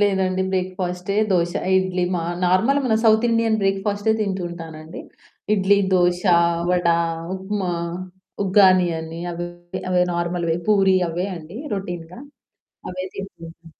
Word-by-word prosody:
లేదండి 190 Hz, -2 st, +1 dB
బ్రేక్‌ఫాస్టే. 185 Hz, 0 st, -2 dB, 0.2 s
దోశ, 175 Hz, -1 st, +1 dB, 0.2 s
ఇడ్లీ 185 Hz, -1 st, +1 dB
మా 170 Hz, -, -1 dB, 0.2 s
నార్మల్ 225 Hz, +11 st, +3 dB
మన 225 Hz, -, +2 dB
సౌత్ 220 Hz, +2 st, +5 dB
ఇండియన్ 230 Hz, -1 st, +2 dB
బ్రేక్‌ఫాస్టే 205 Hz, +2 st, +1 dB
తింటూ 190 Hz, -3 st, -1 dB
ఉంటానండి. 160 Hz, -1 st, -9 dB, 0.5 s
ఇడ్లీ, 200 Hz, 0 st, +3 dB, 0.2 s
దోశ, 175 Hz, 0 st, +3 dB, 0.5 s
వడ, 180 Hz, -1 st, +1 dB, 0.5 s
ఉప్మా, 190 Hz, -1 st, -3 dB, 0.7 s
ఉగ్గానీ 185 Hz, -2 st, +5 dB
అని 160 Hz, +1 st, -7 dB
అవె, 175 Hz, +1 st, -4 dB, 0.4 s
అవే 180 Hz, 0 st, +3 dB
నార్మల్‌వే. 170 Hz, -1 st, -1 dB
పూరి 195 Hz, -2 st, +4 dB
అవే 175 Hz, +4 st, -2 dB
అండి 165 Hz, +6 st, -9 dB, 0.2 s
రొటీన్‌గా. 175 Hz, +1 st, -6 dB, 0.7 s
అవే 185 Hz, 0 st, -5 dB
తింటుంటా. 170 Hz, -4 st, -10 dB
185 Hz, 115 wpm, -22 LUFS, 175-195 Hz, 0.7 s, సౌత్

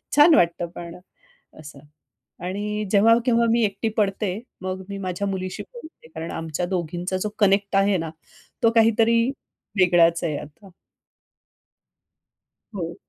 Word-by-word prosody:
छान 300 Hz, +3 st, +7 dB
वाटतं 170 Hz, 0 st, +2 dB
पण 170 Hz, -1 st, -8 dB, 0.6 s
असं 150 Hz, -2 st, -11 dB, 0.7 s
आणि 210 Hz, +3 st, -3 dB
जेव्हा, 225 Hz, +3 st, +5 dB
केव्हा 235 Hz, -1 st, +3 dB
मी 235 Hz, 0 st, +3 dB
एकटी 200 Hz, +2 st, -2 dB
पडते 200 Hz, -2 st, 0 dB, 0.3 s
मग 185 Hz, 0 st, -4 dB
मी 200 Hz, -, -5 dB
माझ्या 190 Hz, +1 st, -3 dB
मुलीशी 185 Hz, -1 st, -4 dB
बोलते 330 Hz, -, -13 dB
कारण 160 Hz, +1 st, -5 dB
आमच्या 165 Hz, +2 st, -3 dB
दोघींचा 175 Hz, 0 st, -3 dB
जो 210 Hz, -, -2 dB
कनेक्ट 200 Hz, -1 st, +2 dB
आहे 195 Hz, 0 st, +3 dB
ना 165 Hz, -1 st, -4 dB, 0.5 s
तो 230 Hz, -, +6 dB
काहीतरी 230 Hz, +1 st, +4 dB, 0.6 s
वेगळाच 170 Hz, -1 st, +4 dB
आहे 155 Hz, -4 st, -1 dB
आता. 165 Hz, +7 st, -12 dB, 2.0 s
हो. 170 Hz, -3 st, -4 dB
195 Hz, 130 wpm, -23 LUFS, 175-210 Hz, 2.0 s, छान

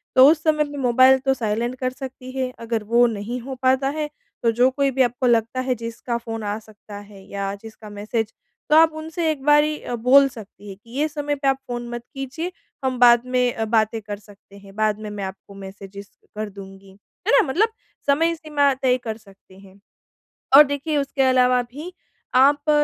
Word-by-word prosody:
तो 260 Hz, +1 st, +9 dB
उस 315 Hz, -1 st, -1 dB
समय 305 Hz, -1 st, +2 dB
में 290 Hz, -1 st, -8 dB
मोबाइल 260 Hz, +1 st, +5 dB
तो 270 Hz, 0 st, +1 dB
साइलेंट 235 Hz, 0 st, -2 dB
कर 255 Hz, -, 0 dB
सकती 255 Hz, -1 st, -9 dB
हैं। 260 Hz, -1 st, -2 dB
अगर 230 Hz, -1 st, -3 dB
वो 235 Hz, +3 st, +4 dB
नहीं 225 Hz, +2 st, -4 dB
हो 265 Hz, +2 st, -7 dB
पाता 260 Hz, +1 st, +2 dB
है, 300 Hz, -1 st, -2 dB, 0.3 s
तो 230 Hz, -, +3 dB
जो 245 Hz, +3 st, +3 dB
कोई 275 Hz, 0 st, 0 dB
भी 265 Hz, +1 st, 0 dB
आपको 250 Hz, +1 st, +1 dB
लगता 230 Hz, +1 st, +1 dB
है, 255 Hz, 0 st, -1 dB
जिसका 230 Hz, +1 st, -4 dB
फ़ोन 225 Hz, -1 st, -6 dB
आ 205 Hz, 0 st, -2 dB
सकता 210 Hz, -1 st, -13 dB
है 200 Hz, -1 st, -14 dB
या 200 Hz, 0 st, -4 dB
जिसका 220 Hz, -1 st, -12 dB
मैसेज, 215 Hz, +2 st, -3 dB, 0.4 s
तो 300 Hz, -, +5 dB
आप 320 Hz, 0 st, +6 dB
उनसे 320 Hz, +1 st, -2 dB
एक 295 Hz, -3 st, -5 dB
बारी 300 Hz, +1 st, +4 dB
अ, 245 Hz, -, -4 dB
बोल 260 Hz, +4 st, +5 dB
सकती 210 Hz, -4 st, -13 dB
हैं 195 Hz, -, -9 dB
कि, 230 Hz, -, -20 dB
"ये 305 Hz, -, +2 dB
समय 290 Hz, -1 st, -3 dB
पे 275 Hz, -1 st, -3 dB
आप 270 Hz, 0 st, +3 dB
फ़ोन 240 Hz, -1 st, -5 dB
मत 240 Hz, 0 st, -6 dB
कीजिए, 275 Hz, +6 st, -5 dB, 0.3 s
हम 260 Hz, -1 st, -1 dB
बाद 240 Hz, 0 st, +6 dB
में 250 Hz, -1 st, +1 dB
अ, 225 Hz, -, -2 dB
बातें 220 Hz, 0 st, +1 dB
कर 205 Hz, 0 st, -6 dB
सकते 200 Hz, -1 st, -18 dB
हैं। 200 Hz, -1 st, -15 dB
बाद 215 Hz, -1 st, 0 dB
में 215 Hz, -1 st, -7 dB
मैं 205 Hz, -1 st, -6 dB
आपको 190 Hz, +1 st, -8 dB
मैसेजेज़ 195 Hz, 0 st, -10 dB, 0.3 s
कर 215 Hz, 0 st, -4 dB
दूँगी।" 195 Hz, 0 st, -12 dB, 0.4 s
है -, -, +3 dB
ना? -, -, 0 dB
मतलब 390 Hz, +12 st, +2 dB, 0.4 s
समय 325 Hz, +4 st, +3 dB
सीमा 295 Hz, -3 st, +1 dB
तय 260 Hz, -1 st, +1 dB
कर 220 Hz, -2 st, -4 dB
सकते 195 Hz, -3 st, -20 dB
हैं। 195 Hz, 0 st, -17 dB, 0.8 s
और 295 Hz, -, +10 dB
देखिए, 285 Hz, +2 st, -3 dB
उसके 275 Hz, 0 st, -1 dB
अलावा 250 Hz, -1 st, +3 dB
भी 290 Hz, +9 st, -9 dB, 0.4 s
आप 285 Hz, +3 st, +4 dB
245 Hz, 205 wpm, -22 LUFS, 215-275 Hz, 0.8 s, और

